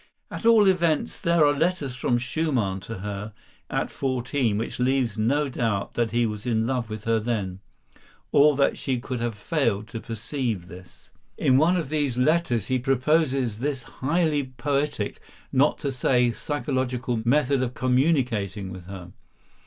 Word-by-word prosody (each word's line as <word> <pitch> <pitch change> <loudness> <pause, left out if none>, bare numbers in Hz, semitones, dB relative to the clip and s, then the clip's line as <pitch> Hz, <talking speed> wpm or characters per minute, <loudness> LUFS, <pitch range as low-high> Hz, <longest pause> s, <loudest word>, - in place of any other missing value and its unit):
At 230 - -2
all 220 -3 +6
events, 170 -5 +1
there 170 -2 +4
are 145 - +4
letters 155 -3 0
from 120 -1 +1
Schumann 125 -7 -1
to 110 +4 -7
her, 105 +1 -5 0.4
at - - -2
fourteen, 130 -3 -1
which 115 - -4
leave 125 -3 +1
no 135 +7 +1
doubt 115 -6 -2
that 120 -1 0
he 120 +2 +1
was 105 +2 -4
in 110 -2 +1
love 125 -2 -1
with 110 -1 -6
her 115 0 +2
then, 105 -5 -2 0.7
or 145 +1 +5
that 140 0 +2
she 130 -2 -1
could 125 0 -4
have 120 -2 -2
failed 115 - 0
to 115 - -5
perceive 115 - -3
this. 90 0 -14 0.3
In 130 0 +4
one 170 +4 +4
of 165 -6 -3
these 145 -5 0
letters 125 - +2
he 130 0 0
proposes 135 -3 +1
this 135 -1 -2
highly 150 +1 0
poetic, 140 -7 -1 0.3
not 140 +3 +3
to 140 -2 -2
say 125 -1 +2
psychological, 130 -4 -2
method 135 +2 +2
of 125 -1 -2
communicating 125 - +1
with 90 -1 -9
her. 90 -2 -9
125 Hz, 160 wpm, -25 LUFS, 110-145 Hz, 0.7 s, all